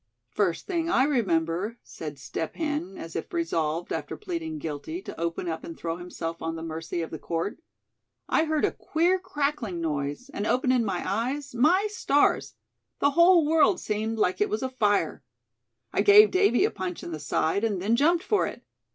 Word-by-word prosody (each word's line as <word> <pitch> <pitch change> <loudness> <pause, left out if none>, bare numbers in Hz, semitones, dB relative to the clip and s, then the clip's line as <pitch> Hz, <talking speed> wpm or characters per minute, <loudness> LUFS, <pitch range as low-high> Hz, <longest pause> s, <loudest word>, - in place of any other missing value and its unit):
"First 190 -5 0
thing 335 -3 -1
I 260 - +4
remember," 195 - 0
said 150 -3 -8
Step 135 +4 -5
Hen, 295 - -3
as 165 - -8
if 165 - -4
resolved, 170 - -1
after - - -4
pleading 335 -5 -4
guilty, 160 - -5
to - - -8
open 170 +1 -2
up, 160 -1 -3
and 165 - -8
throw 165 0 -3
himself 165 -2 -6
on 165 0 -3
the 165 - -6
mercy 165 +1 -4
of 160 - -7
the 160 - -6
court; 170 - -3 0.7
"I 315 - +2
heard 310 -1 +1
a - - +1
queer 350 +4 +1
crackling 285 - -2
noise, 150 - -3
and 205 - -2
openin' 255 -1 +2
my 190 -5 -2
eyes, 255 +8 -2
my 320 - +4
stars! 290 -8 +2 0.4
the 285 - +3
whole 340 +1 +6
world 310 -1 +4
seemed 220 +1 -2
like 185 -3 +1
it 210 - +3
was 215 +4 -2
afire. 230 -6 +1 0.7
I - - +2
gave 420 +1 +8
Davy 370 -10 +4
a - - 0
punch 185 -3 -5
in - - -6
the 155 - -5
side, 160 +7 0
and 210 -4 0
then 210 +5 +2
jumped 335 +7 +3
for 420 0 +2
it. - - -8
220 Hz, 185 wpm, -27 LUFS, -, 0.7 s, gave